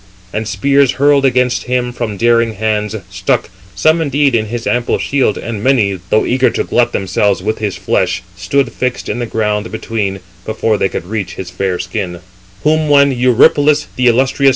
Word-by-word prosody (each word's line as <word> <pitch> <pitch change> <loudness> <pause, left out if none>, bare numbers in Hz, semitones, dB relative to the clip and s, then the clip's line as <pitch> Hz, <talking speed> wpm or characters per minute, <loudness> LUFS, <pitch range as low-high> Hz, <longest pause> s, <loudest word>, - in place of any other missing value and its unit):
And 110 0 -3
spears 135 +7 +2
hurled 140 +1 +3
against 125 -1 +1
him 125 -1 -1
from 115 -4 -4
daring 115 +1 +2
hands, 110 0 -1 0.2
stuck, 95 -1 -1 0.2
some 155 - +3
indeed 145 -2 +1
in 110 -2 +1
his 120 +1 -5
ample 120 0 0
shield, 135 -7 0
and 110 -3 -5
many, 105 -8 +2
though 110 - +2
eager 130 +1 +2
to - - -2
glut 120 0 +1
themselves 95 0 0
with 110 +2 -2
his 105 -3 -2
flesh, 95 +1 -1
stood 140 +9 0
fixed 125 0 -3
in 120 - -2
the 120 - -3
ground 105 -1 -1
between, 105 -3 -3 0.2
before 110 -1 -1
they 95 - +1
could 85 - -5
reach 105 -1 -4
his 90 -1 -7
fair 95 -1 -2
skin. 90 0 -4
110 Hz, 155 wpm, -15 LUFS, 100-125 Hz, 0.2 s, hurled